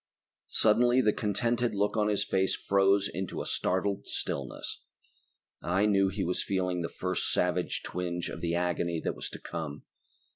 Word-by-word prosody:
Suddenly 120 +3 +4
the 105 -3 +3
contented 115 +2 0
look 105 +2 +1
on 105 -1 +2
his 105 -1 +1
face 95 -1 +1
froze 100 0 +3
into 90 +6 -4
a - - -3
startled 100 +2 -1
stillness. - - -4 0.8
I 95 +5 +2
knew 100 -2 +4
he 95 +1 -2
was 90 +1 0
feeling 90 -2 -1
the 85 - -2
first 90 0 -1
savage 90 0 0
twinge 90 -1 -3
of - - -6
the 85 0 0
agony 85 -1 0
that - - -2
was - - -5
to - - -8
come. 75 -3 -6
95 Hz, 160 wpm, -30 LUFS, 90-105 Hz, 0.8 s, Suddenly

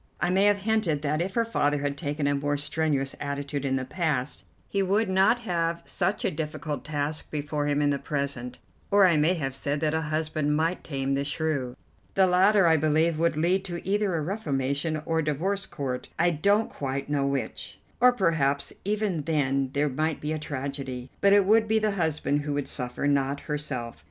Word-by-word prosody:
I 175 +3 +1
may 190 +2 +4
have 205 0 +4
hinted 205 -9 +1
that 150 +2 0
if 190 +2 -3
her 230 -1 +2
father 150 -10 +1
had 140 0 -1
taken 145 -1 -3
a 145 - +2
more 145 +1 0
strenuous 145 -2 -1
attitude 140 0 -3
in 135 -1 0
the 130 -1 -2
past, 150 -3 -2 0.2
he 200 - 0
would 200 +3 +2
not 195 +6 +3
have 170 -5 -1
such 190 +2 -1
a - - +2
difficult 150 -2 -4
task 150 0 -3
before 145 0 -2
him 145 0 +1
in 145 - +3
the 140 - -1
present, 140 -3 -3 0.3
or 200 -1 +6
I 175 -3 +4
may 155 +4 +3
have 135 -5 -3
said 145 +2 -2
that 155 -1 +1
a 160 - +1
husband 155 -1 0
might 165 +3 0
tame 135 -2 -2
the 140 0 0
shrew. 145 -4 -2 0.4
The 190 - +5
latter, 190 +2 +4
I 165 -1 +5
believe, 155 +1 +2
would 165 -2 +1
lead 180 +4 +2
to 175 -1 -6
either 200 -2 +1
a 160 - 0
reformation 150 -4 -1
or 165 - 0
the 155 -1 +1
divorce 195 +7 -2
court, 130 -3 -4
I 175 +1 +3
don't 200 +7 +2
quite 135 0 -3
know 140 -1 0
which. 140 -1 -3 0.2
Or 250 +1 +7
perhaps 160 - +1
even 205 -5 0
then 140 -4 +1
there 145 +1 +2
might 155 +3 -1
be 150 +1 -2
a 155 - -3
tragedy; 135 -3 -5
but 200 - +5
it 200 -1 +6
would 220 +2 +4
be 220 +1 +3
the 215 -1 +1
husband 160 -5 0
who 145 0 -3
would 145 -1 -2
suffer, 125 +1 -4
not 140 0 +1
herself. 130 - -4
150 Hz, 200 wpm, -27 LUFS, 140-180 Hz, 0.4 s, Or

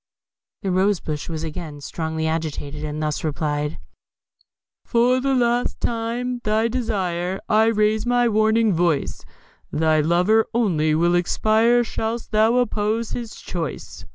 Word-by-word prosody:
The 195 - -1
rose 190 +1 +2
bush 150 0 -5
was 160 -1 -4
again 155 -2 -6
strongly 160 +2 -4
agitated, 155 -2 -3
and 155 0 -3
thus 150 -1 -2
replied: 150 -1 -2 1.1
For 245 +2 +2
the 270 +1 +1
last 240 0 +1
time, 240 +2 -2
at 240 - -17
thy 215 +2 +2
desire, 190 -7 -2
I 215 +1 +4
raise 215 -1 +2
my 245 0 +3
warning 220 0 +3
voice: 170 -3 0 0.5
Thy 155 0 +2
lover 180 +8 +3
only 160 -10 +2
will 170 +2 +2
expire 220 +7 +3
Shouldst 225 0 -4
thou 220 +2 +3
oppose 225 -2 0
his 235 -3 -5
choice. 165 -6 -6
205 Hz, 135 wpm, -22 LUFS, 160-230 Hz, 1.1 s, I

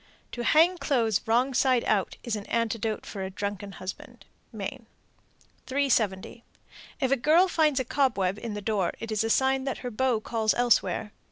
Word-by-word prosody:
To 240 - -4
hang 335 +7 +4
clothes 230 -7 +1
wrong 245 +4 +2
side 255 -1 +3
out 200 -3 0
is 235 -2 -2
an 205 -1 -7
antidote 225 -1 -1
for 195 - -7
a 190 - -3
drunken 200 +1 -5
husband. 185 0 -9 0.3
Maine. - - -6 0.8
370. 235 -6 0 0.6
If 265 -3 0
a - - +5
girl 310 +8 +4
finds 310 -6 +2
a 260 - -1
cobweb 210 -9 0
in 225 -3 -5
the 205 - -5
door, 200 -4 0
it 225 0 -6
is 215 0 +1
a 225 - -1
sign 265 +2 +2
that 270 - -2
her 245 - -3
beau 245 0 +1
calls 220 -1 0
elsewhere. 220 -4 +1
230 Hz, 175 wpm, -27 LUFS, 210-265 Hz, 0.8 s, a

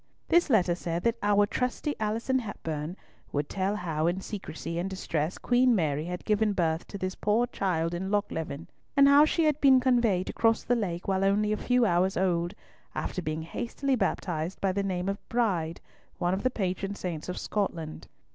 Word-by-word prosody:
This 345 -2 +4
letter 185 -8 +4
said 170 -1 -3
that 235 0 +1
"our 205 0 +4
trusty 250 +6 -2
Alison 225 +5 0
Hepburn" 165 -6 -5 0.3
would 145 0 -1
tell 195 +1 -1
how 165 -5 -1
in 175 +2 0
secrecy 170 -4 -5
and 185 +2 -2
distress 165 -3 -2
Queen 245 0 +3
Mary 155 -4 0
had 180 +1 -5
given 210 -1 +2
birth 165 -3 0
to 200 - -7
this 185 0 -3
poor 215 +5 +1
child 175 -8 -1
in 185 +2 -3
Lochleven, 165 -7 -2 0.3
and 280 0 +8
how 285 +2 +7
she 330 +2 +1
had 305 -1 +2
been 265 -2 +7
conveyed 240 -8 +2
across 225 -1 +2
the 245 - +2
lake 180 -6 -3
while 190 0 +1
only 205 +2 +2
a - - +1
few 250 +1 +2
hours 185 0 +2
old, 175 0 0 0.4
after 185 - -3
being 155 -1 -3
hastily 260 - -2
baptized 175 -6 -2
by 195 - +1
the 200 +2 -1
name 185 -2 -2
of 200 0 -1
Bride, 180 -9 0 0.4
one 175 +1 0
of 190 - -1
the 255 - +2
patron 195 -3 -2
saints 175 -4 -5
of 180 - -4
Scotland. 165 -7 -3
195 Hz, 185 wpm, -28 LUFS, 170-225 Hz, 0.4 s, and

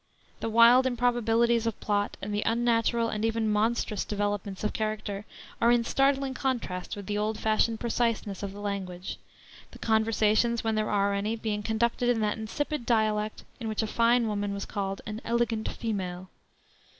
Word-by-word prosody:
The 225 - -2
wild 235 +3 +7
improbabilities 235 -1 +2
of 225 - -2
plot 205 -1 -1
and 205 +1 -3
the 205 - 0
unnatural 230 0 +2
and 215 0 -3
even 225 0 +1
monstrous 215 -1 +1
developments 205 -1 -3
of 210 - 0
character 215 -2 -3 0.4
are 235 +1 +5
in 240 -1 +4
startling 270 +2 +1
contrast 245 -9 -2
with 200 -1 -8
the 205 +1 -2
old 215 +1 -1
fashioned 220 +1 +1
preciseness 230 -4 -1
of 200 -1 -4
the 205 +1 -9
language; 190 -3 -4 0.5
the - - -13
conversations, 220 +1 +2
when 225 -1 0
there 215 0 0
are 200 -1 +2
any, 205 +3 -1
being 215 -2 -2
conducted 235 +3 0
in 240 -2 +2
that 210 +1 0
insipid 290 +5 -3
dialect 215 -2 0 0.2
in 230 - -4
which 220 0 -1
a - - 0
fine 235 +2 +3
woman 205 -1 -2
was 200 - -4
called 195 -1 -3
an 215 +1 -5
"elegant 235 -1 0
female." 185 -5 -4
220 Hz, 170 wpm, -28 LUFS, 205-235 Hz, 0.5 s, wild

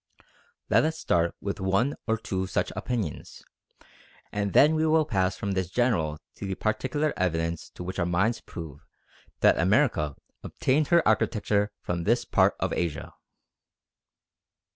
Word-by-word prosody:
Let - - +4
us 160 +1 -1
start 85 - +1
with 100 0 -4
one 100 +9 +1
or 110 0 +1
two 95 -4 -3
such 95 - -1
opinions, 110 -11 -4 0.9
and 100 -1 -2
then 150 +2 +6
we 160 0 +1
will 155 0 +3
pass 95 -7 0
from 100 - -3
this 95 -2 -1
general 90 -10 +1 0.2
to 100 - -5
the 95 - -2
particular 130 +9 -1
evidence 85 -2 -2
which 90 +1 -5
to - - 0
our - - +1
minds 100 +7 +1
proves 75 -4 -9 0.6
that - - +5
America 95 - +2 0.3
obtained 140 +3 0
her 170 -2 +4
architecture 105 -1 +1
from 85 -1 -2
this 120 +2 +2
part - - +3
of - - -1
Asia. 85 -4 -3
100 Hz, 145 wpm, -27 LUFS, 90-125 Hz, 0.9 s, then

